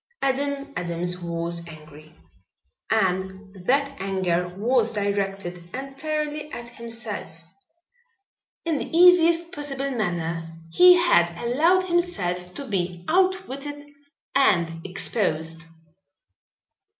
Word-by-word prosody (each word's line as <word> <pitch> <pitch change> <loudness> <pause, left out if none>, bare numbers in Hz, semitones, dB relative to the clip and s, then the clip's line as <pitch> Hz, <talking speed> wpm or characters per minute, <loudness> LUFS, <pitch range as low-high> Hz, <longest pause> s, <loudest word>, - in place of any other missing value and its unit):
Adam 280 +1 -1
Adams 175 0 -3
was 170 0 -3
angry, 155 -1 -13 0.8
and 190 -2 0
that 280 +1 +2
anger 185 -2 0
was 235 +2 +2
directed 195 -3 -2
entirely 300 +3 -4
at 240 -3 -7
himself. 230 -8 -6 1.2
In 320 -4 0
the 325 - -3
easiest 340 -1 +6
possible 275 -2 -3
manner 165 -7 -3
he 360 - +8
had 175 - +3
allowed 315 - +3
himself 200 - -1
to 280 - -6
be 180 -5 -3
outwitted 305 -6 0 0.5
and 170 -11 +2
exposed. 165 -4 -1
220 Hz, 90 wpm, -24 LUFS, 175-285 Hz, 1.2 s, he